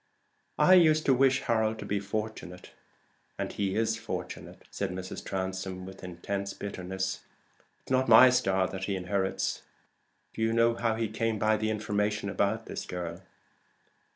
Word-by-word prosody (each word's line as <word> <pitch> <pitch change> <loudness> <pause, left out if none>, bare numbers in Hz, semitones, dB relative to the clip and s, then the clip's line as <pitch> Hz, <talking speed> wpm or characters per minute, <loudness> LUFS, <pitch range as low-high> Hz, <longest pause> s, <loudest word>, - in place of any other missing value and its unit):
I 185 - +6
used 155 -4 +5
to 135 - +5
wish 130 +1 +3
Harold 110 -2 +1
to - - -7
be 100 - -1
fortunate, 100 -3 -5 0.7
and - - -3
he 100 -2 -1
is 115 0 +1
fortunate," 115 - -7
said 100 - -2
Mrs. 95 0 -6
Transome, 95 -1 -4
with 95 0 -11
intense 100 +3 -4
bitterness. 95 -1 -4 0.6
"It's - - -12
not 130 -1 +2
my 125 +3 +9
star 95 -6 +2
that 95 0 -4
he 100 - -1
inherits." 95 +1 -1 0.7
"Do - - -6
you 110 0 +2
know 115 0 +4
how 115 -1 0
he 115 0 -1
came 110 +1 -1
by 110 +1 +2
the 110 0 -1
information 105 -1 -1
about 110 +4 0
this - - -6
girl?" 90 -2 -5
105 Hz, 155 wpm, -29 LUFS, 95-115 Hz, 0.7 s, my